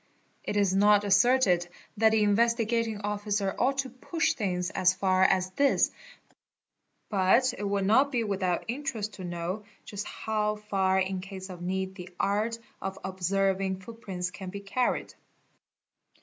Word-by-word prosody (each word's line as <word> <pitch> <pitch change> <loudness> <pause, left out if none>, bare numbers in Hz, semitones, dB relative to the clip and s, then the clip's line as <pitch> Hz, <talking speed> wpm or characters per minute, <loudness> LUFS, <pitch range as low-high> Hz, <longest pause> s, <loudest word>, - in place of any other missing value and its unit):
It 205 - -2
is 200 -2 +3
not 205 +1 +5
asserted 200 -3 +4 0.3
that 220 +1 +5
the 220 -1 +3
Investigating 230 0 +1
Officer 205 -1 -1
ought 270 +2 +2
to 270 -2 -2
push 320 +6 -1
things 180 -3 -2
as 185 0 +2
far 185 0 +2
as 185 -1 +3
this, 280 +7 +3 1.2
but 215 +6 +3
it 205 - -5
will 200 0 0
not 260 +8 +4
be 240 -4 0
without 190 -4 -1
interest 235 -4 -3
to 185 - -9
know 175 +4 -4 0.2
just 205 0 -5
how 215 -1 -1
far 195 -3 0
in 190 0 -1
case 190 0 -8
of 175 -1 -9
need 190 +1 -2
the 180 -2 -9
art 215 +3 0 0.2
of 195 0 -4
observing 190 0 0
footprints 185 -4 -5
can 190 0 -8
be 200 +2 -7
carried. 240 +5 -1
200 Hz, 150 wpm, -28 LUFS, 190-220 Hz, 1.2 s, not